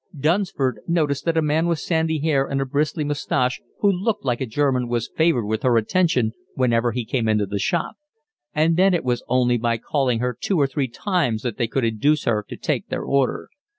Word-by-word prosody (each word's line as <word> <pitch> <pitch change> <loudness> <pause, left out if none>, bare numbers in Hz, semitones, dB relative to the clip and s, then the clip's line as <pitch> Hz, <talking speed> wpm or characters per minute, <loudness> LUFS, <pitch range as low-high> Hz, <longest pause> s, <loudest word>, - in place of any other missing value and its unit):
Dunsford 155 -4 0
noticed 150 -5 0
that 165 -1 +1
a 160 - +3
man 155 +3 +1
with 170 -1 +1
sandy 160 0 0
hair 145 -3 +1
and 135 - -1
a 135 - 0
bristly 150 +3 -1
moustache, 140 -3 -1 0.2
who 205 - +4
looked 200 0 -2
like 125 -1 0
a 130 - -1
German, 130 0 0
was 120 -1 -2
favoured 160 -9 +2
with 110 +1 -2
her 125 -2 +3
attention 125 - +2 0.2
whenever 120 -2 +2
he 120 0 -3
came 115 -1 -1
into 105 -1 +2
the 100 +1 -3
shop; 170 - -1 0.5
and 160 +2 +2
then 190 0 +4
it 170 - -1
was 125 -1 0
only 125 -1 +2
by 115 0 0
calling 130 -1 0
her 125 +2 -1
two 190 -5 0
or 140 - +4
three 135 0 -1
times 125 - -1
that 120 -4 -3
they 120 - +1
could 125 +2 -1
induce 130 +8 +1
her 105 -3 0
to - - -7
take - - -2
their - - -3
order. 140 -2 0
135 Hz, 215 wpm, -22 LUFS, 120-160 Hz, 0.5 s, who